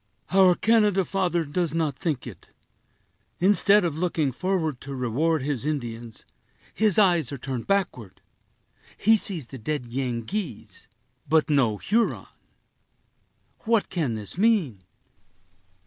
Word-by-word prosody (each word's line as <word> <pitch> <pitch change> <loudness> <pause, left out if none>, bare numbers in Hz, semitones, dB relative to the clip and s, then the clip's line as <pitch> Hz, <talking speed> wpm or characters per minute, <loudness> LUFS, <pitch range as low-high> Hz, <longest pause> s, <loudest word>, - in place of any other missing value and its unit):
"Our 185 -2 +5
Canada 210 -3 +2
father 175 -3 0
does 165 +1 -2
not 155 -4 0
think 155 -5 -3
it. 115 -9 -11 0.9
Instead 200 +1 +4
of 160 -2 -3
looking 165 -5 0
forward 160 -2 -2
to 140 0 -7
reward 135 +5 0
his 140 -4 -2
Indians, 120 -6 -5 0.5
his 215 -4 +2
eyes 175 - +3
are 140 - -5
turned 130 -2 -5
backward. 175 - -2 0.8
He 225 +2 +4
sees 185 - -1
the 130 +3 -10
dead 125 0 -4
Yengeese, 125 - -4 0.4
but 155 0 +3
no 120 -7 +2
Huron. 225 - 0 1.3
What 225 -2 +1
can 150 -10 -1
this 105 - -6
mean?" 195 - +2
155 Hz, 120 wpm, -25 LUFS, 125-190 Hz, 1.3 s, Our